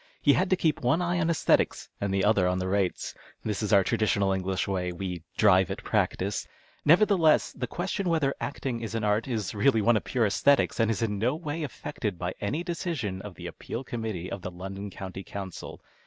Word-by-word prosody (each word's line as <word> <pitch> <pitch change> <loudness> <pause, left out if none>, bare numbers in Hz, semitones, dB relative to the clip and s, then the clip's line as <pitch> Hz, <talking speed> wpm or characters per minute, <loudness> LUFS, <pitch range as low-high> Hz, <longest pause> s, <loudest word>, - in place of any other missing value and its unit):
He 145 - +5
had 130 - +1
to 185 - +4
keep 160 -4 0
one 155 +7 +2
eye 175 0 0
on 165 -1 +1
esthetics 165 - +2
and 100 -1 0
the 95 0 +1
other 100 -4 +4
on 90 0 +1
the 95 0 -2
rates. 95 -1 -1 0.3
This 105 -1 -2
is 105 - -1
our 100 -2 +6
traditional 100 -2 +1
English 95 0 -1
way. 90 -2 -1
We 90 -1 -5
" - - -35
drive 95 -4 +5
at - - -5
practice." 100 +2 0 0.4
Nevertheless, 170 -1 +5
this 125 -2 -4
question 190 +1 -2
whether 150 -5 +2
acting 130 -4 -3
is 115 0 -4
an 115 - -1
art 105 +3 +1
is 110 -7 -2
really 115 +3 +3
one 115 +3 +4
of 105 - 0
pure 120 -3 +1
a;sthcties, 135 +8 +3
and 115 -1 +3
is 115 +1 0
in 105 -3 -1
no 125 +7 +1
way 160 0 -4
affected 110 - -4
by 90 +1 -3
any 125 +12 -1
decision 160 - -3
of 100 -3 -9
the - - -9
Appeal 120 - -6
Committee 110 -8 -4
of 100 - -4
the 90 - -4
London 95 +3 -6
County 95 0 -7
Council. 95 -2 -7
105 Hz, 215 wpm, -28 LUFS, 95-140 Hz, 0.4 s, our